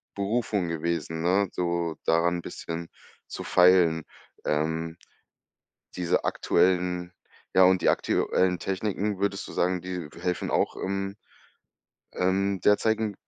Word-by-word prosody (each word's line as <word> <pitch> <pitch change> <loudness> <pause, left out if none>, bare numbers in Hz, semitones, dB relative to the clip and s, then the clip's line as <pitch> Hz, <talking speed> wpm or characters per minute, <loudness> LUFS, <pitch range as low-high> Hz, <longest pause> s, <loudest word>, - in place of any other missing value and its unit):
Berufung 100 -2 -1
gewesen, 80 0 -2
ne? 95 +3 +2
So, 85 -2 -1
daran 85 +2 +3
n' - - -5
bisschen 85 0 -6 0.4
zu - - -6
feilen. 90 -3 +4 0.4
Ähm, 80 +2 -1 1.0
diese 90 -2 0
aktuellen 90 -1 +1 0.4
ja, 95 - +6
und 90 -1 +5
die - - +1
aktuellen 90 -1 +1
Techniken, 100 +1 -2
würdest 100 0 -1
du - - -9
sagen, 90 0 0
die 90 -4 -5
helfen 90 0 -2
auch - - +1
im, 95 +1 -3 1.0
ähm, 95 +1 0
derzeigig 110 +2 +2
90 Hz, 115 wpm, -27 LUFS, 85-95 Hz, 1.0 s, ja